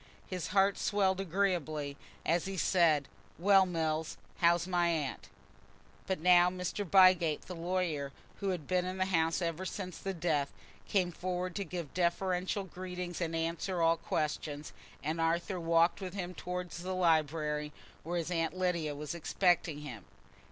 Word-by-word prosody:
His 180 -3 -4
heart 195 0 +3
swelled 195 -2 +1
agreeably 165 -6 -1 0.3
as 170 +1 +2
he 195 0 -4
said, 160 -6 +3 0.3
"Well, 195 +1 +5
Mills, 160 -2 -1 0.2
how 170 0 +6
is 170 0 -3
my 175 -2 +2
aunt?" 155 -5 -2 0.8
But 190 -3 -1
now 175 +1 +6
Mr. 180 +2 -3
Bygate, 185 -4 +5
the 185 - -7
lawyer, 170 -5 -1 0.3
who 200 - -1
had 175 -6 -2
been 180 +2 +1
in 185 +1 -4
the 185 - +1
house 165 -2 +1
ever 170 +2 -2
since 185 -1 -5
the 195 -1 -4
death, 155 -4 0 0.4
came 185 -3 +1
forward 180 +1 -3
to 200 - -1
give 175 -6 -6
deferential 180 +2 0
greetings 180 -1 -6
and 165 -1 -1
answer 170 +3 -2
all 165 0 +4
questions, 150 -3 -3 0.3
and 160 +3 -1
Arthur 170 +3 0
walked 165 +2 +3
with 185 0 -5
him 180 -2 -4
towards 180 0 -5
the 185 +1 -3
library, 155 -3 +1 0.3
where 175 +2 -3
his 170 +1 -2
Aunt 165 0 -1
Lydia 170 -5 0
was 150 +2 -5
expecting 170 -2 +1
him. 125 -8 -8
175 Hz, 160 wpm, -32 LUFS, 160-185 Hz, 0.8 s, how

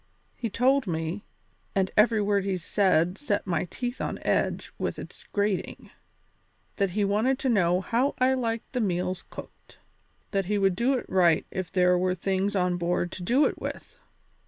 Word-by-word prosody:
He 230 - -3
told 255 +3 +2
me, 165 +3 -3 0.5
and 190 -1 +1
every 215 0 +4
word 200 -1 +1
he 195 -1 -1
said 180 0 +1
set 205 -8 -1
my 170 -4 0
teeth 245 +8 -5
on - - -2
edge - - 0
with - - -2
its - - -10
grating, 205 -2 -2 0.9
that 200 -2 +1
he 205 - +3
wanted 220 +7 +1
to 265 - -1
know 180 -5 +3
how 245 +8 0
I 255 +1 +3
liked 230 -3 -3
the 250 - 0
meals 185 -2 -1
cooked; - - -12 0.5
that 195 -2 0
he 210 +1 +1
would 195 -2 +2
do 240 +7 +2
it 255 - -3
right 175 -4 +3
if 185 -3 -4
there 180 -1 +3
were 185 0 +1
things 195 +3 -1
on 180 -1 +1
board 175 0 -1
to - - -7
do 250 +11 +3
it - - -2
with. - - -6
195 Hz, 180 wpm, -27 LUFS, 180-230 Hz, 0.9 s, every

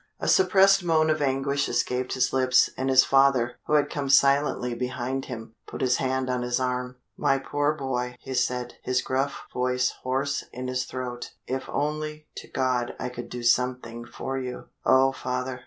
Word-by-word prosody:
A - - -3
suppressed 195 - +5
moan 160 -2 +3
of 155 -1 -1
anguish 140 +1 0
escaped 125 +1 -1
his 130 -1 +1
lips, 130 -1 +4
and 130 +1 -2
his 130 -1 +7
father, 135 -3 +3
who - - -1
had 150 -1 +3
come 140 -2 -3
silently 140 -3 +3
behind 125 +2 -3
him, 115 -3 -8
put - - -7
his 125 -1 +2
hand 130 0 -1
on 125 -1 -1
his 120 0 0
arm. 125 0 -2 0.2
"My 135 - +2
poor 145 +2 0
boy," 125 -4 -3
he 135 - -7
said, 125 0 -1
his 125 0 0
gruff 135 +2 -2
voice 125 0 +1
hoarse 135 +2 -1
in 125 0 -5
his 130 0 -1
throat, 125 -1 -6
"if 130 +1 -4
only 150 +1 -3
to - - -8
God 125 -2 -1
I 125 - -3
could 120 -1 -8
do 120 -1 -6
something 120 -1 0
for 135 +2 -5
you!" 125 -1 -6 0.2
"Oh, 135 +1 +5
father!" 125 0 -4
130 Hz, 180 wpm, -26 LUFS, 125-140 Hz, 0.2 s, his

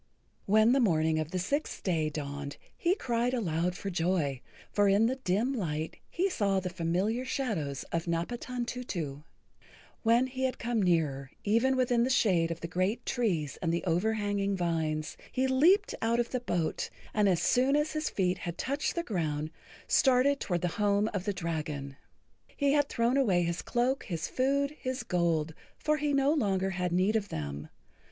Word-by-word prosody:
When 215 +3 +5
the 270 - +4
morning 160 -8 +2
of 155 -1 -2
the 185 - -3
sixth 280 - -2
day 160 -5 +1
dawned 145 -1 -5 0.2
he 350 +2 +1
cried 245 - 0
aloud 175 -5 0
for 195 +1 -4
joy, 165 -6 0 0.3
for 205 -1 +3
in 200 +3 +4
the 255 +3 0
dim 235 +3 0
light 160 - -3
he 370 +3 +1
saw 200 - +1
the 185 -1 -4
familiar 185 +7 0
shadows 190 - -2
of 165 +1 -2
Napatantutu. 205 - -3 0.8
When 235 +2 +4
he 260 0 -2
had 260 - -1
come 235 -1 -1
nearer, 155 -7 +1
even 230 +6 +3
within 245 -2 +2
the 250 - +1
shade 185 -10 +3
of 165 0 -5
the 170 - -3
great 185 +7 -1
trees 180 - -1
and 165 - 0
the 170 - -1
overhanging 200 +2 0
vines, 160 -3 -1
he 260 - +1
leaped 330 +11 +4
out 230 +1 +2
of 240 - -1
the 255 - 0
boat, 175 -9 -1 0.2
and 210 -1 +3
as 175 -3 +2
soon 260 +3 +3
as 295 +1 +1
his 310 0 -1
feet 185 -1 0
had 170 0 -5
touched 280 +3 -1
the 340 - -1
ground, 155 - -2 0.4
started 270 +1 +4
toward 175 -3 -1
the[Pg 180 +3 -2
67] 205 - +3
home 205 +2 +2
of 195 -2 -2
the 205 - +1
dragon. 150 -5 -4 0.6
He 285 -1 +3
had 290 -1 +2
thrown 235 +3 +1
away 195 -10 +3
his 170 0 -2
cloak, 250 +2 0
his 165 -5 -3
food, 280 +3 0
his 260 +1 -3
gold, 165 -3 0 0.2
for 305 0 +1
he 295 0 0
no 280 +1 +3
longer 195 -9 +1
had 180 -1 -2
need 185 +5 +2
of 205 -3 0
them. 75 -1 -5
200 Hz, 180 wpm, -30 LUFS, 165-250 Hz, 0.8 s, When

